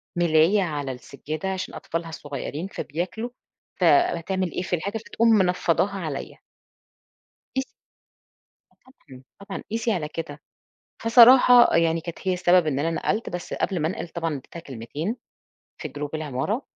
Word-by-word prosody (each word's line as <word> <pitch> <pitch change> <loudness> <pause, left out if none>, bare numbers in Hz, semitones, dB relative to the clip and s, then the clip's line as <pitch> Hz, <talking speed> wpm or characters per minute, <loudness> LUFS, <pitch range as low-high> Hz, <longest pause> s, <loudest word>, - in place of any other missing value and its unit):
ملاية 170 +3 +4
على 145 -5 -3
السجّادة 145 +7 -6
عشان 185 0 -5
أطفالها 165 0 -4
الصغيّرين، 145 +2 -5
فبياكلوا، 185 - -4 0.5
فهتعمل 190 - +2
إيه - - -3
في 185 -1 -1
الحاجة 200 +6 -3
فتقوم 230 +1 0
منفّضاها 190 -2 +2
عليَّ. 155 -6 -5 1.2
قيس 265 0 0 1.1
آه - - -32 0.3
طبعًا، 130 -1 -12 0.2
طبعًا 200 -1 -7
قِيسي 230 +1 0
على 170 -7 -1
كده. 150 -2 -7 0.6
فصراحة 245 +1 +7
يعني 165 0 +2
كانت 170 0 -7
هي 185 - +3
السبب 180 -1 +3
إن 140 -3 0
أنا 165 +3 0
نقَلت، 210 +6 -1
بس 175 0 -6
قبل 190 -3 -1
ما 155 - +1
أنقِل 175 - -4
طبعًا 165 0 -3
أنا 150 - -3
ادّيتها 135 +5 -10
كلمتين 145 - -5 0.6
في - - -5
group 145 0 -5
العمارة، 155 - -2
170 Hz, 145 wpm, -24 LUFS, 155-200 Hz, 1.2 s, فصراحة